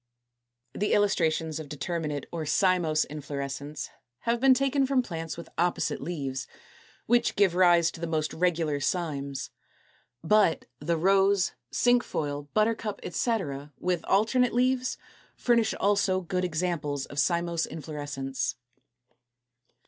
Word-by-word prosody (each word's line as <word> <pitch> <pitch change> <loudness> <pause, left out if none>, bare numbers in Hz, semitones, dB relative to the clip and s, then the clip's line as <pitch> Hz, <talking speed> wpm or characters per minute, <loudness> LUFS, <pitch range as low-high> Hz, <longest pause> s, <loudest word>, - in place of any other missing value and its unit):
223. 210 - -1
The - - +4
illustrations 160 -6 +1
of 155 -2 -8
determinate 150 0 -3
or 165 -2 -3
cymose 160 -1 +2
inflorescence 145 0 -5 0.3
have 235 0 0
been 265 +1 +6
taken 275 +1 +2
from 265 -2 +2
plants 165 -6 -5
with 170 - -8
opposite 175 +1 0
leaves, 135 -6 -4 0.6
which 240 +1 +2
give 195 -3 +4
rise 175 -2 +5
to 165 - -11
the 170 - -2
most 155 -1 -1
regular 165 -4 +1
cymes. 140 -3 -2 0.7
But 200 -1 +3
the 165 +3 0
Rose, 195 +2 +3 0.2
Cinquefoil, 150 -12 0
Buttercup, 215 -1 +1
etc., 150 - -2
with 180 -2 -1
alternate 235 +5 +2
leaves, 255 +1 +1 0.4
furnish 235 -3 +2
also 200 -2 +2
good 180 +1 -1
examples 155 -5 -2
of 140 - -5
cymose 170 +2 +1
inflorescence. 145 -4 -4
170 Hz, 120 wpm, -28 LUFS, 150-205 Hz, 0.7 s, been